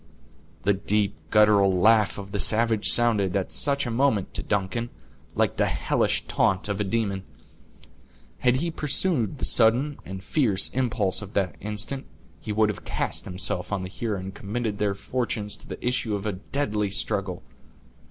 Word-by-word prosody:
The 100 - +3
deep 100 +1 0 0.2
guttural 105 -2 +4
laugh 105 +2 +3
of 100 -1 -8
the 100 - -3
savage 110 0 +4
sounded, 105 -6 +5
at 95 -2 -2
such 140 -1 +1
a 120 - -3
moment, 115 -5 0
to - - -2
Duncan, 105 +4 -2 0.5
like - - 0
the - - +2
hellish - - 0
taunt 95 +1 +1
of 100 0 -2
a - - +1
demon. 100 -2 -1 1.2
Had 125 0 +3
he 165 +6 -2
pursued 150 - +1
the - - -2
sudden 125 +6 +3
and 95 0 -8
fierce 110 -11 +2
impulse 115 -7 0
of 100 -1 -10
the 95 -5 0
instant, 105 +7 -3 0.3
he 110 - -6
would 110 0 +2
have 105 - -5
cast - - -3
himself 90 0 -2
on 100 -2 -2
the 95 - -6
Huron, 105 -2 -4
and 95 +1 -7
committed 105 +1 -4
their 100 -2 0
fortunes 110 -2 -3
to - - -17
the - - -6
issue 120 -4 0
of 100 +1 -5
a 105 - -1
deadly 105 0 -2
struggle. 95 -2 -3
105 Hz, 170 wpm, -25 LUFS, 100-120 Hz, 1.2 s, sounded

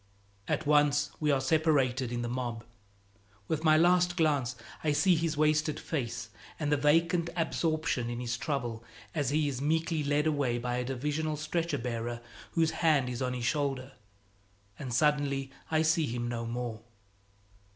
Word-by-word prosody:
At 155 - -1
once 145 0 +3
we 150 - +1
are 140 -2 +3
separated 135 -4 +2
in 120 0 -2
the - - -2
mob. 120 -2 -3 0.8
With 160 0 -1
my 155 -1 +6
last 175 +1 +4
glance 145 -7 +1 0.3
I 150 -2 +2
see 145 +6 +4
his 160 -1 -1
wasted 155 0 +2
face 135 -8 -4 0.3
and 150 -1 -1
the - - +5
vacant 165 +4 +2
absorption 155 -6 0
in 120 0 -4
his 120 0 -2
trouble 120 -5 -3 0.3
as 145 -5 0
he 150 +1 +1
is 135 -2 -3
meekly 160 +1 0
led 145 +1 +1
away 140 -6 +1
by 120 +1 -2
a 125 - -1
Divisional 150 +4 -2
stretcher 160 0 -1
bearer 120 -1 -3 0.3
whose 165 -2 +2
hand 150 -6 +3
is 125 0 -4
on 125 -1 0
his 120 -1 -3
shoulder; 135 -2 -1 0.9
and 135 -4 -5
suddenly 140 0 +1 0.2
I 160 0 +2
see 160 -1 +2
him 120 +1 -3
no 115 -1 -3
more. 120 -2 -4
145 Hz, 160 wpm, -30 LUFS, 125-155 Hz, 0.9 s, my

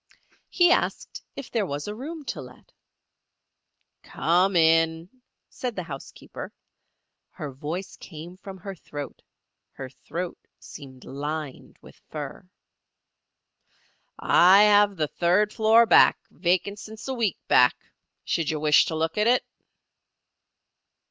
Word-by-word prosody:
He 350 -1 +4
asked - - -1
if 275 - -8
there 225 -3 0
was 145 +2 -5
a 210 - -4
room 295 +7 -8
to - - -5
let. - - -15 1.3
"Come 180 +4 +1
in," 165 +1 +3 0.4
said 245 -3 -5
the 180 - -4
housekeeper. 140 -4 -9 0.8
Her 145 -2 -7
voice 155 +8 -6
came 165 +1 -10
from 195 0 -10
her 195 +2 -8
throat; 145 -5 -9 0.5
her 130 -1 -8
throat 170 +6 -6 0.2
seemed 130 -4 -12
lined 145 0 -6
with - - -17
fur. 155 +4 -8 1.7
"I 190 +4 +6
have 205 -1 +5
the 155 -3 -1
third 185 +7 +1
floor 225 +1 +5
back, - - +6
vacant 185 +4 -1
since 220 +3 -10
a 265 - -2
week 230 -6 -1
back. 125 0 +5 0.5
Should 165 -3 -1
you 155 -2 -2
wish 150 0 +4
to 160 - -4
look 160 +5 -1
at 210 - +2
it?" 250 +1 +3
175 Hz, 125 wpm, -25 LUFS, 155-210 Hz, 1.7 s, I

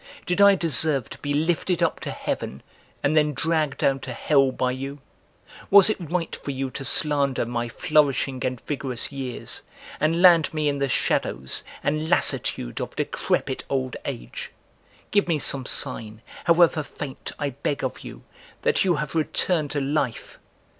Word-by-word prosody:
Did 180 +3 +1
I 200 0 +8
deserve 155 - +1
to - - -9
be 145 - -3
lifted 170 +3 +1
up 165 - +1
to - - -5
heaven 70 - -4 0.4
and 145 +2 +2
then 150 -2 +3
dragged 155 -3 0
down 135 0 +2
to 130 -1 -6
hell 135 +1 +3
by 130 0 0
you? 135 +2 -5 0.7
Was 200 +1 +8
it 215 - -3
right 175 -2 -1
for - - -8
you 135 -1 -3
to 135 - -5
slander 140 -2 +2
my 120 0 -3
flourishing 140 -3 +1
and 130 -1 -2
vigorous 135 -4 -3
years 130 -3 -5 0.4
and 165 +2 +2
land 175 -3 +6
me 155 -1 +1
in 140 -1 0
the 140 -1 0
shadows 65 - -1 0.2
and 155 +2 0
lassitude - - +1
of - - -5
decrepit 130 -2 -1
old 130 -2 -1
age? - - -6 0.6
Give 205 -2 +3
me 165 -3 +2
some 135 -2 +1
sign, 110 -5 -3 0.2
however 170 -2 +5
faint, 145 -2 -7
I 145 -2 -2
beg 140 +2 -3
of 130 - -3
you, - - -10 0.4
that - - +3
you 180 -3 +3
have 150 0 -3
returned 160 0 0
to 145 - -1
life!" 135 -3 -2
145 Hz, 165 wpm, -24 LUFS, 130-160 Hz, 0.7 s, I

